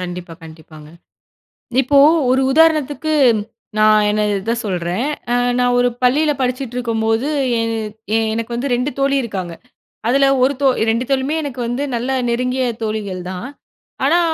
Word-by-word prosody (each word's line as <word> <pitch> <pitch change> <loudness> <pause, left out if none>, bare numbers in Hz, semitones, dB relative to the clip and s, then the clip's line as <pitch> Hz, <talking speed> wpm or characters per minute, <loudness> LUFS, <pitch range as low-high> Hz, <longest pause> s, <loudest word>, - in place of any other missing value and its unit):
கண்டிப்பா, 175 -2 -6
கண்டிப்பாங்க. 155 -1 -13 0.9
இப்போ, 280 +2 +3 0.3
ஒரு 260 +1 +3
உதாரணத்துக்கு, 310 0 +2 0.7
நான் 215 0 +5
என்ன 215 - 0 0.2
இத 225 +4 -1
சொல்றேன். 180 +3 -2 0.3
அ - - +3 0.2
நான் 245 0 +2
ஒரு 245 0 +3
பள்ளியில 290 +5 +3
படிச்சுட்டு 255 -1 -2
இருக்கும்போது 225 0 0 0.3
எ - - 0 0.7
எனக்கு 230 +1 -4
வந்து 245 +4 -2
2 250 +4 -1
தோழி 275 0 +2
இருக்காங்க. 185 -6 -5 0.5
அதில, 275 +3 +3 0.2
1 270 +2 +3
தோ 275 - +4 0.2
2 230 +3 0
தோழியுமே 270 +3 0
எனக்கு 270 -4 -6
வந்து 245 +4 -2
நல்ல 245 +3 -2 0.2
நெருங்கிய 250 +2 0 0.2
தோழிகள் 205 -4 -3
தான். 185 +7 -6 0.6
ஆனா, 330 +5 +4
245 Hz, 140 wpm, -18 LUFS, 215-270 Hz, 0.9 s, நான்